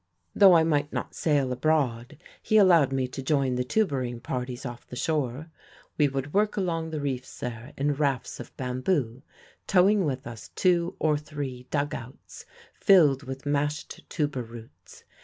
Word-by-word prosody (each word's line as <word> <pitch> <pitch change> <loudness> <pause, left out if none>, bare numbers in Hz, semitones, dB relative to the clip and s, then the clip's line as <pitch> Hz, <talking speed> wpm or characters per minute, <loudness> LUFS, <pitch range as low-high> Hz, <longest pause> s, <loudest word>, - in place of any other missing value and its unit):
"Though 195 -3 +7
I 165 - +5
might 145 -2 0
not - - -4
sail 145 -5 +1
abroad 125 -4 0 0.2
he 215 - +2
allowed 170 -9 +6
me 130 -1 0
to 135 - -6
join 135 -1 +1
the 125 0 0
tuburing 130 - -1
parties 125 +1 -5
off 120 -1 -8
the - - -9
shore. 150 +1 -2 0.4
We 150 - +3
would 135 +1 -4
work 210 +1 +1
along 165 -4 -1
the 155 -1 -4
reefs 135 -3 -4
there 120 +3 -6
in 145 +1 +1
rafts 140 -3 -1
of 120 - -10
bamboo, 130 -1 -1 0.5
towing 195 +2 +4
with 135 -5 -2
us 120 -2 -9
two 175 -2 +2
or 150 -2 +1
three 140 -4 -6
dug 145 0 -1
outs 125 +3 -10 0.3
filled 155 -9 +5
with 135 0 -8
mashed 145 +1 -2
tubur 145 -5 -1
roots. 115 -1 -13
140 Hz, 160 wpm, -27 LUFS, 125-160 Hz, 0.5 s, Though